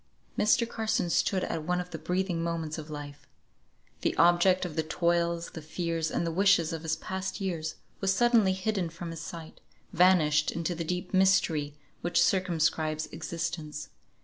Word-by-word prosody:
Mr. 225 +3 +3
Carson 220 -6 -1
stood 190 +2 +1
at 160 - -2
one 180 +2 0
of 180 0 -6
the 160 - -5
breathing 180 -2 -1
moments 165 -2 -3
of 155 0 -9
life. 145 -1 -8 0.7
The - - 0
object 175 +2 +4
of 165 -4 -6
the 160 - +2
toils, 170 +1 0
the 160 - -8
fears, 165 0 -2
and - - -1
the 165 - -1
wishes 180 -2 +3
of 165 - -4
his 160 -1 -1
past 190 +5 -4
years, 170 -5 -3 0.2
was 195 -1 +1
suddenly 225 -2 +4
hidden 190 -2 -1
from 165 +1 -7
his 165 -1 -7
sight, 165 -1 -9 0.3
vanished 165 -4 +4
into 170 +1 -2
the 170 0 -4
deep 180 +3 -4
mystery 165 -6 +3 0.3
which 175 - +1
circumscribes 160 -4 +1
existence. 160 -3 -5
170 Hz, 165 wpm, -29 LUFS, 160-185 Hz, 0.7 s, object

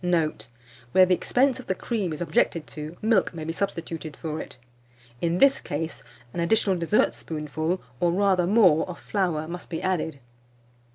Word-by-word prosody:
Note. 160 -10 0 0.5
Where 185 - +7
the 185 - +3
expense 260 +8 +2
of 255 - -10
the 190 - 0
cream 205 -4 -2
is 155 - -5
objected 165 -1 +1
to, 155 +2 -8
milk 215 -5 +2
may 160 - -5
be 165 +1 -3
substituted 165 -5 -4
for 155 -1 -4
it. - - -10 0.6
In 170 0 +1
this 275 +5 +5
case, 160 +2 -4 0.3
an - - -4
additional 195 +2 +2
dessertspoonful, 160 -2 0 0.2
or 175 - +3
rather 185 -1 +2
more, 185 -6 +5
of 180 - -7
flour 175 -6 -1
must 175 +2 -7
be 165 - -3
added. 165 -6 -1
170 Hz, 165 wpm, -26 LUFS, 160-190 Hz, 0.6 s, Where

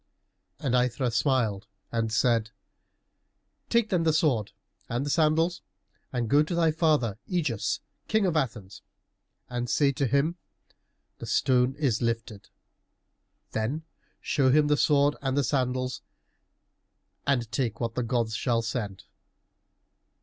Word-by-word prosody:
And 130 -4 -1
Aithra 125 0 +1
smiled 115 -5 +1 0.2
and 115 -1 -1
said, 115 0 +2 1.2
"Take, 235 -2 +2
then, 180 -3 +2
the 165 -1 +3
sword 145 - +1 0.4
and 120 +4 -1
the 145 - -1
sandals 165 +3 +2 0.5
and 120 -3 -1
go 145 +6 +5
to 155 +3 -1
thy 165 -2 +3
father 150 - +1
Ægeus, 150 - -1 0.3
King 220 -2 +2
of 175 -3 0
Athens, 110 -9 -2 0.7
and 120 0 -3
say 140 -2 +3
to 140 0 -1
him, 140 +7 +1 0.8
'The - - -7
stone 130 -1 +2
is 135 -7 0
lifted!' 115 -3 -3 1.0
Then 125 +9 -2 0.4
show 135 -3 +1
him 150 +2 +4
the 150 - +4
sword 145 0 +3
and 135 0 -1
the 145 - +3
sandals, 130 -2 -1 1.3
and 120 -5 +1
take 115 -1 -1
what 115 -2 -2
the 125 - -1
gods 115 -2 -1
shall 115 -1 0
send." 105 -4 -4
130 Hz, 130 wpm, -27 LUFS, 115-150 Hz, 1.3 s, go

